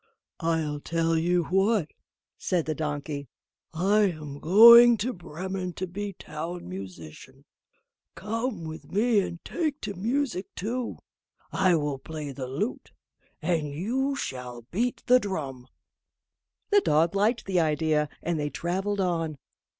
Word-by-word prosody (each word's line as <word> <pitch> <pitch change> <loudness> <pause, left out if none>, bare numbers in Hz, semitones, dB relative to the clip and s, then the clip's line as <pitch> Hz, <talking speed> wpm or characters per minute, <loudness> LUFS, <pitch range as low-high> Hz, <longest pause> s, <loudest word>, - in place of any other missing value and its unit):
"I'll 160 -3 -1
tell 165 +2 0
you 175 +2 +2
what," 195 -1 +2 0.5
said 175 -4 -1
the 155 - -1
donkey, 145 -1 -4 0.4
"I 200 +6 +3
am 150 -4 -7
going 235 +7 +9
to 245 +4 -2
Bremen 180 +2 -5
to 185 - -4
be 200 +3 -5
Town 170 - -6
Musician; 90 -4 -10 0.7
come 225 -1 -3
with 160 0 -8
me 220 +2 +3
and 170 -3 -4
take 310 -4 -2
to 205 - -4
music 225 0 -1
too. 235 +5 -3 0.5
I 185 -2 +3
will 145 -3 -1
play 150 -1 -6
the 130 -1 -6
lute, 165 - -4 0.5
and 160 -3 0
you 255 - -1
shall 125 - -5
beat 235 +7 -1
the 250 +1 +6
drum." 140 - -5 1.0
The 410 0 +6
dog 165 - +2
liked 215 +4 +1
the 185 -2 +1
idea, 155 -1 +1
and 170 -1 -1
they 145 0 -1
travelled 195 +6 -2
on. 165 -4 -1
175 Hz, 135 wpm, -27 LUFS, 150-205 Hz, 1.0 s, going